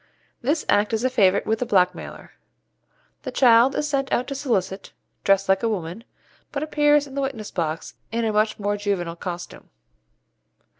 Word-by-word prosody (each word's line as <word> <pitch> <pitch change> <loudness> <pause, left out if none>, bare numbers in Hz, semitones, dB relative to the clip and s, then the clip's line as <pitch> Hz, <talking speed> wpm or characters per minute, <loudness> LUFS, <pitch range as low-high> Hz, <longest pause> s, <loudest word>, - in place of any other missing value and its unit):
This 295 +6 0
Act 210 +2 +2
is 225 +1 0
a 255 - +1
favourite 200 -4 +3
with 220 0 0
the 245 - -1
blackmailer. 180 -4 0 0.9
The 260 - -5
child 250 +1 +5
is 300 - -1
sent 275 -2 -1
out 250 - +1
to - - -3
solicit, 200 -9 -2 0.3
dressed 195 0 +3
like 190 0 +3
a 230 - +1
woman, 190 +2 -4 0.5
but 285 +1 -3
appears 295 -1 +3
in 275 - -12
the 280 - -2
witness 255 -6 -4
box 160 -2 -3 0.2
in 230 0 -1
a 220 - 0
much 215 +1 +1
more 205 0 -1
juvenile 195 -5 -2
costume. 175 0 -7
220 Hz, 170 wpm, -23 LUFS, 195-270 Hz, 0.9 s, child